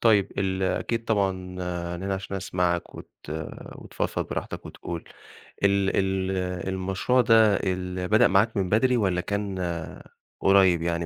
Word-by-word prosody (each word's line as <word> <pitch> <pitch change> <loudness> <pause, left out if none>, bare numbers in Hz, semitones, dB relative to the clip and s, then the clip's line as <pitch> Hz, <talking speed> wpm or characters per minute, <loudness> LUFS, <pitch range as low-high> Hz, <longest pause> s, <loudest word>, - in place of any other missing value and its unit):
طيب، 105 -4 +4
ال 95 -1 0
أكيد 115 +5 -1
طبعًا 100 -4 +2
أنا 90 -2 -5
هنا 100 - 0
عشان 95 0 -5
أسمعك 90 -2 -1
وت - - -10 0.7
وتفضفض - - -3
براحتك - - -5
وتقول، 85 -1 -7 0.6
ال 100 -1 +3
ال 95 -1 0 0.4
المشروع 95 +7 +1
ده 110 -3 +5
ال 90 -1 -2
بدأ 110 +5 +5
معاك 100 +4 +2
من 95 -2 0
بدري 125 +5 +3
والّا 95 -5 +1
كان 100 0 -3 0.8
قريّب 95 -3 +5
يعني 85 0 -1
95 Hz, 135 wpm, -26 LUFS, 90-100 Hz, 0.8 s, ده